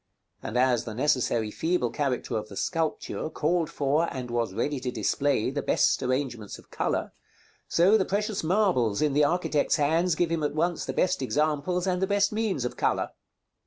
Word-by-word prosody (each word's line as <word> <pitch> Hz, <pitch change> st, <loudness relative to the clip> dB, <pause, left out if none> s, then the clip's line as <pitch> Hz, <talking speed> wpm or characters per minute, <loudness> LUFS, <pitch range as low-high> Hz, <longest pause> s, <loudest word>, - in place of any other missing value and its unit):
And 120 Hz, -, -4 dB
as 125 Hz, -2 st, +2 dB
the 110 Hz, -3 st, -6 dB
necessarily 120 Hz, -5 st, +1 dB
feeble 160 Hz, -6 st, 0 dB
character 130 Hz, -4 st, -2 dB
of 110 Hz, -1 st, -3 dB
the 100 Hz, -, -9 dB
sculpture 165 Hz, -2 st, -2 dB
called 165 Hz, +1 st, 0 dB
for 150 Hz, +2 st, 0 dB
and 125 Hz, -3 st, -5 dB
was 120 Hz, -4 st, -1 dB
ready 145 Hz, -2 st, -1 dB
to 125 Hz, 0 st, -3 dB
display 135 Hz, -1 st, 0 dB
the 145 Hz, +1 st, -2 dB
best -, -, +2 dB
arrangements 130 Hz, -5 st, -2 dB
of -, -, -19 dB
color, -, -, -2 dB, 0.5 s
so 190 Hz, +6 st, +4 dB
the -, -, +3 dB
precious 210 Hz, 0 st, -1 dB
marbles 160 Hz, -, +2 dB
in 150 Hz, -2 st, +1 dB
the 150 Hz, +1 st, +4 dB
architect's 150 Hz, -1 st, +1 dB
hands 160 Hz, +3 st, +2 dB
give 170 Hz, 0 st, 0 dB
him 165 Hz, -1 st, 0 dB
at 150 Hz, 0 st, -1 dB
once 170 Hz, +1 st, 0 dB
the -, -, -2 dB
best 185 Hz, -5 st, +1 dB
examples 155 Hz, +6 st, 0 dB
and 180 Hz, -1 st, 0 dB
the 190 Hz, -, +2 dB
best 200 Hz, +1 st, +2 dB
means 210 Hz, -, -1 dB
of 125 Hz, -, -3 dB
color. -, -, 0 dB
150 Hz, 185 wpm, -27 LUFS, 125-175 Hz, 0.5 s, so